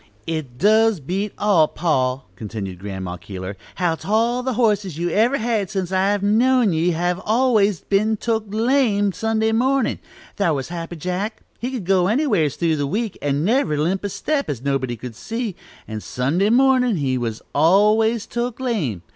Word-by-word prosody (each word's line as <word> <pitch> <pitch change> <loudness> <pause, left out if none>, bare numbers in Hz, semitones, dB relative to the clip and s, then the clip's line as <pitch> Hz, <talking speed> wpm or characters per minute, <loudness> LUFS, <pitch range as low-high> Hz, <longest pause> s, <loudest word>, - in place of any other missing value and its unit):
"It 155 -7 -4
does 220 - +4
beat 190 +8 -3
all, 190 -7 +4
pa," 135 -6 0
continued 95 -3 -6
Grandma 95 -2 -5
Keeler, 95 +2 -7 0.2
"how 175 -3 +1
't 165 - -9
all 230 +3 +2
the 260 0 -2
horses 210 -8 +1
you've 175 +1 -1
ever 235 +8 +3
had 220 -4 -1
since 190 -3 -3
I've 195 +2 +1
known 230 0 +3
ye 165 +2 +1
have 175 +2 -1
always 215 -5 +2
been 215 +2 +1
took 225 0 -1
lame 220 -2 +2
Sunday 220 +2 0
mornin'. 255 +2 +1 0.4
Thar' 170 -6 +2
was 135 +1 -4
'Happy 170 0 -5
Jack,' 185 +6 -4 0.2
he 245 - -3
could 250 -8 -5
go 185 -1 +3
anywhers 210 - +1
through 165 -2 0
the 145 -1 -1
week, 215 +5 -2
and 145 +2 0
never 215 - +2
limp 175 +7 0
a 200 - -2
step, 280 +9 -2
as 130 -4 -4
nobody 135 -3 -1
could 120 0 -8
see, 225 - -4 0.3
and 110 -1 -5
Sunday 155 - 0
mornin' 250 -1 +4
he 135 -5 0
was 115 -3 -3
always 210 +7 +3
took 240 0 -3
lame! 175 - -2
195 Hz, 170 wpm, -21 LUFS, 150-225 Hz, 0.4 s, does